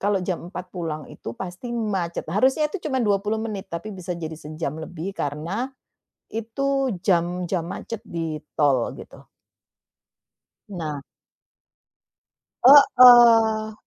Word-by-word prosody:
kalau 200 -1 0
jam 180 -2 -3
4.00 180 -1 -8
pulang 160 -4 -4
itu 115 - -8
pasti 185 +6 -7
macet, 195 -7 -2
harusnya 265 - +2
itu 400 - -5
cuman 260 -3 0
20 205 +1 0
menit, 215 -3 -5
tapi 170 +6 -6
bisa 180 -1 -5
jadi 160 -2 -6
sejam 155 -1 -5
lebih 175 +3 -6
karena, 170 - -3 0.6
itu 265 +3 -1
jam-jam 175 -1 0
macet 225 +4 -6
di 165 -2 -4 0.2
tol 140 -5 +2
gitu. - - -13 1.4
Nah. 155 -7 -5 1.6
Heeh 240 -5 +7
190 Hz, 115 wpm, -23 LUFS, 165-225 Hz, 1.6 s, Heeh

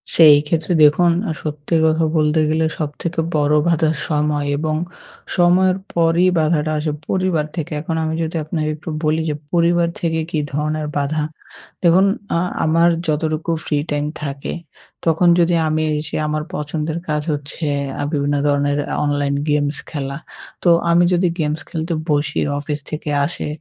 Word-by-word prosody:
সেই 155 -3 +9
ক্ষেত্রে 165 +2 0
দেখুন, 165 +4 +5 0.3
সত্যি 150 +1 -3
কথা 160 +1 +2
বলতে 155 +1 +2
গেলে 160 +1 +1
সবথেকে 160 +3 -3 0.2
বড় 150 0 +3
বাধা 165 -2 +2 0.2
সময় 150 -1 0
এবং 155 +1 -1 0.6
সময়ের 180 +1 +4 0.2
পরই 170 +2 +3
বাধাটা 155 -1 +1
আসে 150 0 -1 0.2
পরিবার 185 -5 0
থেকে। 165 -4 -4
এখন 165 +1 -3
আমি 160 0 -1
যদি 160 +1 -4
আপনাকে 155 0 -2
একটু 155 +3 -9
বলি 155 +1 +1
যে 150 - -1 0.2
পরিবার 170 0 +3
থেকে 160 -1 0
কী 155 - 0
ধরনের 150 +1 -1
বাধা। 145 +2 0 0.6
দেখুন 180 +3 +5 0.3
আ - - +2 0.3
আমার 165 +2 +4 0.2
যতটুকু 155 +1 -1
ফ্রি 150 - 0
টাইম 145 0 0 0.2
থাকে, 140 -1 -4 0.5
তখন 165 +2 +3
যদি 175 0 +3
আমি 155 0 0 0.2
এসে 155 +1 -6
আমার 150 0 -1
পছন্দের 155 +1 -3
কাজ 150 -1 0
হচ্ছে 145 +3 -6 0.4
আ - - -1
বিভিন্ন 145 -2 0
ধরনের 145 0 +1 0.2
আ - - 0
online 145 -1 0
games 145 0 +1
খেলা, 140 -2 -4 0.5
তো 175 - +4 0.2
আমি 170 +1 +5
যদি 180 +1 +3
games 155 0 -1
খেলতে 165 +1 -3 0.2
বসি 145 0 +1 0.2
অফিস 150 0 -3
থেকে 155 0 -4 0.2
আসে, 170 - -5
155 Hz, 155 wpm, -19 LUFS, 150-165 Hz, 0.6 s, সেই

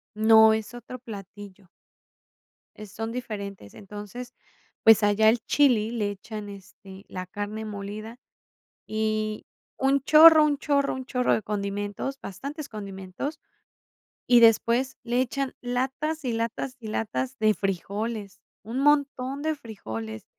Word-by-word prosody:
No, 220 0 +7
es 220 +2 -4
otro 245 +1 -9
platillo. 205 -4 -11 1.1
Eh, 215 - -9
son 225 +3 -5
diferentes. 200 - -6
Entonces, 210 +4 -9 0.5
pues, 225 -1 +7
allá 205 +1 +4
el 235 +2 +4
chili 240 -7 +3
le 215 -4 -1
echan, 205 +1 -7
este, 195 0 -12
la 185 0 -6
carne 205 +3 -5
molida 215 +2 -7 0.7
y 215 0 -2 0.3
un 270 +1 +2
chorro, 315 +1 +8
un 290 -2 +1
chorro, 280 -1 +1
un 260 -1 -6
chorro 250 -2 +1
de 220 - -1
condimentos, 205 +5 -3
bastantes 280 - -7
condimentos, 200 - -6 0.9
y 245 -1 +7
después 235 +3 +4
le 240 +1 +1
echan 265 +1 -2
latas, 265 +5 -2
y 245 - 0
latas, 230 +3 -3
y 220 - -8
latas 250 +5 -3
de 215 -1 +4
frijoles, 200 +2 -4 0.2
un 230 +5 -4
montón 280 -2 +1
de 315 0 0
frijoles. 110 - -7
220 Hz, 130 wpm, -26 LUFS, 205-255 Hz, 1.1 s, chorro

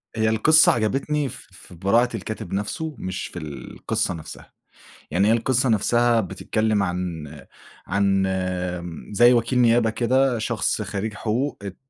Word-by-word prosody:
هي 110 0 +1
القصة 155 +9 +6
عجبتني 135 +5 -1
ف - - -9
في - - -13
براعة 110 +8 +2
الكاتب 100 -3 -6
نَفْسُه، 145 +10 -3
مش 95 0 -4
في 90 - -8
القصة 75 +3 -3
نَفْسها، 80 -2 -10 0.6
يعني 100 +4 +2
هي - - +5
القصة 125 +2 +1
نَفْسها 120 +2 +3
بتتكلم 105 +2 -1
عن 90 -4 -3 0.6
عن 95 0 +1 0.6
م 85 +4 -9
زي 120 +4 +6
وكيل 120 +1 +1
نيابة 115 -1 +4
كده 125 +2 +1
شخص 110 -1 -1
خرّيج 100 +2 -4
حقوق، 120 +6 -2
ات 100 -2 -7
110 Hz, 140 wpm, -23 LUFS, 95-120 Hz, 0.6 s, القصة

